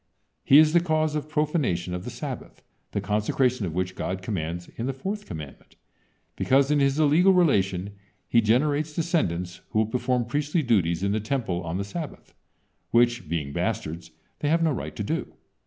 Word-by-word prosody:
He 140 - +7
is 155 0 +6
the 175 - +6
cause 155 -2 +1
of 150 0 -3
profanation 150 - 0
of 90 0 -5
the - - -4
Sabbath, - - -7 0.3
the - - -1
consecration 105 +2 0
of 80 - -6
which 90 0 -1
God 95 0 -4
commands 85 -3 -3
in 115 - -3
the 135 - -1
fourth 200 +9 -5
commandment, 75 -4 -9 0.6
because 135 +2 +3
in 150 - +3
his 140 0 +2
illegal 160 +6 +5
relation 100 - +2 0.4
he 115 - +4
generates 145 +7 +1
descendants 90 - -1
who - - -3
will 110 - +4
perform 125 +2 0
priestly 145 +6 0
duties 90 -8 +1
in 100 - +1
the 110 - +1
Temple 110 -6 -2
on 85 0 -3
the 100 - -2
Sabbath, 150 +10 -7 0.6
which, 120 -7 +2
being 75 -4 -2
bastards, 80 +1 -3 0.3
they 145 - 0
have 165 +1 +3
no 160 - +3
right 80 - -4
to - - -3
do. - - -3
120 Hz, 180 wpm, -26 LUFS, 90-150 Hz, 0.6 s, He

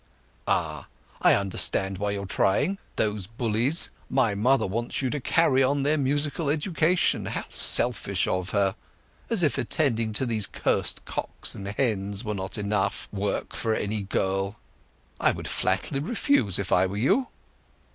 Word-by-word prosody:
"Ah! - - -1 0.3
I - - +6
understand 95 0 +1
why 105 0 -1
you 100 -1 -3
are - - -6
trying—those 105 - -1
bullies! 115 +7 +1 0.2
My 125 -6 +2
mother 125 +7 +2
wants 115 +7 -3
you 130 - 0
to 150 - -2
carry 135 -1 +3
on 140 +1 +2
their 150 +2 +2
musical 145 +2 0
education. 160 +3 +1
How - - -3
selfish 100 -6 +4
of 90 0 -1
her! 100 -2 +1 0.6
As 225 -6 +1
if 150 - +1
attending 115 -7 0
to 130 - 0
these 110 -4 0
curst - - -1
cocks - - -4
and 100 - -7
hens 100 -3 -1
here 110 - -6
were - - 0
not 95 +2 -4
enough 100 -1 -1
work 100 0 -3
for 110 -1 0
any 105 0 -2
girl. 95 +1 -1 0.6
I - - +4
would - - -6
flatly 135 - -1
refuse, 160 - +1
if 100 -1 -4
I 90 +1 +4
were 100 +2 -5
you." 190 - +2
110 Hz, 155 wpm, -26 LUFS, 100-140 Hz, 0.6 s, I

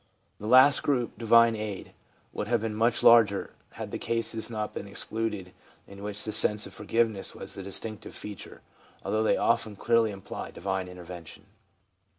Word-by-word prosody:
The 105 - -7
last 130 +4 +7
group, 125 -5 -1
divine 115 0 +4
aid, 105 -3 -7 0.4
would - - -5
have 120 -1 0
been 110 -1 -4
much 115 +2 0
larger, 110 -4 +4 0.2
had - - -8
the - - -5
cases 115 -1 -2
not 110 -2 -5
been 100 - -7
excluded 105 -2 -4 0.3
in 100 0 -13
which 105 0 -1
the 110 - -3
sense 105 0 +6
of - - -9
forgive 115 0 0
ness 100 -3 -5
was - - -6
the - - -7
distinctive 100 +3 -2
feature, 105 -2 -9 0.4
although 110 - -1
they 110 - +1
often 110 -2 0
clearly 115 +1 +1
imply 100 -2 -8
divine 95 0 -4
intervention. 90 -2 -11
110 Hz, 165 wpm, -27 LUFS, 100-115 Hz, 0.4 s, last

